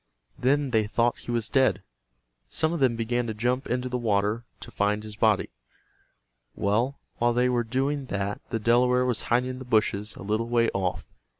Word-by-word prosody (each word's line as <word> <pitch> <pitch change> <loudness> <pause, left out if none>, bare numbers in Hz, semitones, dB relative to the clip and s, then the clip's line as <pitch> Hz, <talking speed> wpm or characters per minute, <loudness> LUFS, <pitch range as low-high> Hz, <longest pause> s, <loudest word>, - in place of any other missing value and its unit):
Then 140 +1 +2
they 110 -3 +2
thought 115 +2 +1
he - - -11
was 115 -2 0
dead. 110 -8 +2 0.7
Some 160 +1 0
of 170 - -2
them 130 -4 +3
began 120 +1 -1
to 110 - -3
jump 125 +4 -1
into 125 +1 -1
the 125 0 -2
water 105 +1 0 0.2
to - - -9
find 105 +1 0
his 105 -1 -9
body. 110 -2 +2 1.0
Well, 115 +7 0 0.2
while 120 0 +3
they 125 +1 +2
were 120 -1 +1
doing 135 +4 -1
that 100 -1 -3
the 115 - -1
Delaware 125 +3 +3
was 125 -3 0
hiding 125 +2 +2
in 130 - -7
the - - -7
bushes 110 -3 0
a - - -9
little 110 +3 -1
way 115 -1 +3
off. 95 -2 -2
120 Hz, 190 wpm, -26 LUFS, 105-125 Hz, 1.0 s, them